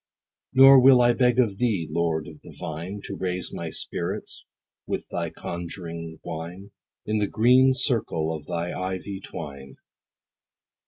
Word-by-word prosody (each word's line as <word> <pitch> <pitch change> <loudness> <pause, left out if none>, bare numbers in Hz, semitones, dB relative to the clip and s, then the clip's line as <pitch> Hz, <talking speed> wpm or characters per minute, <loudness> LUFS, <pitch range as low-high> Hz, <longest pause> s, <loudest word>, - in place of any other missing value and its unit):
Nor 135 +1 +8
will 130 0 +7
I 120 0 +5
beg 125 -1 +2
of 110 -6 +1
thee, 105 -10 0
Lord 80 -1 -1
of 75 - -12
the - - -13
vine, 85 +6 -6
To - - -6
raise 90 -1 -3
my - - -5
spirits - - -4 0.4
with - - -3
thy - - -3
conjuring 85 -2 -7
wine, 85 +5 -7 0.3
In 105 0 0
the 105 - +1
green 130 +5 +4
circle 110 - +1
of 75 -1 -10
thy 85 0 -3
ivy 95 +1 -4
twine. 70 -7 -9
95 Hz, 145 wpm, -25 LUFS, 80-120 Hz, 0.4 s, Nor